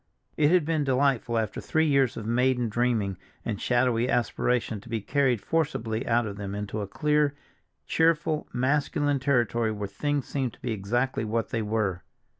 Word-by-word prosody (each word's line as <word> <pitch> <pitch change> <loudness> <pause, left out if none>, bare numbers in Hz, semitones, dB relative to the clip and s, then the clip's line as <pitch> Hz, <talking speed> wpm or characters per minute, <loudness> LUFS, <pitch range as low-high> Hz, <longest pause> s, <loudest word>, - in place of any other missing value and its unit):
It 150 -1 +3
had 175 -2 +4
been 160 -2 +1
delightful 130 -3 +1
after 110 -2 -2
three 160 0 +1
years 140 -5 +2
of 105 - -5
maiden 125 +1 +1
dreaming 110 -5 0 0.3
and 105 -4 -3
shadowy 125 -1 +2
aspiration 120 -3 0
to 115 - -14
be 115 -1 -1
carried 130 +1 +1
forcibly 130 -8 -1
out 120 0 +2
of 100 -2 -6
them 100 -1 -5
into 105 +1 -4
a 100 - -4
clear, 150 +4 +1 0.5
cheerful, 160 -1 +1
masculine 145 +2 +1
territory 120 -4 +1
where 105 -1 -4
things 145 +8 -2
seemed 130 -4 -2
to - - -19
be 120 - -3
exactly 115 +5 -1
what 115 +1 -1
they 115 - -1
were. 105 -4 -1
120 Hz, 170 wpm, -27 LUFS, 110-140 Hz, 0.5 s, had